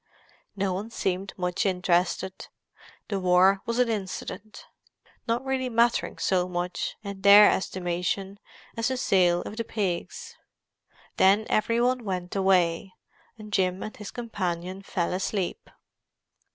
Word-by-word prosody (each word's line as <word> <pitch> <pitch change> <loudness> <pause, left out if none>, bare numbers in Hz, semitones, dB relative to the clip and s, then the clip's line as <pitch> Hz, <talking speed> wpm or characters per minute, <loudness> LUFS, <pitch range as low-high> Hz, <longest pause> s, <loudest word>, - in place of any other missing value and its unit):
No 195 -2 -1
one 200 +5 -4
seemed 190 -3 -2
much 180 0 -1
interested; 185 0 0 0.6
the 200 -2 -2
war 185 +2 +4
was 235 0 -1
an 250 -1 +3
incident, 215 0 -5 0.6
not 235 +3 -1
really 260 -1 -1
mattering 235 0 +1
so 180 -1 +1
much, 180 0 -3
in 200 -1 -7
their 200 +1 +9
estimation, 185 +2 -2 0.4
as 230 -1 0
the 260 - -1
sale 180 -6 +2
of 215 - -8
the 230 - -1
pigs. 225 - -4 0.8
Then 200 +3 +4
every 230 +2 +2
one 250 0 +1
went 180 -3 -4
away, 185 -1 +2 0.4
and 215 -1 -11
Jim 185 -1 +1
and 215 - -7
his 210 -1 -8
companion 185 -5 -4
fell 180 -3 -2
asleep. 190 0 -3
195 Hz, 130 wpm, -26 LUFS, 180-220 Hz, 0.8 s, their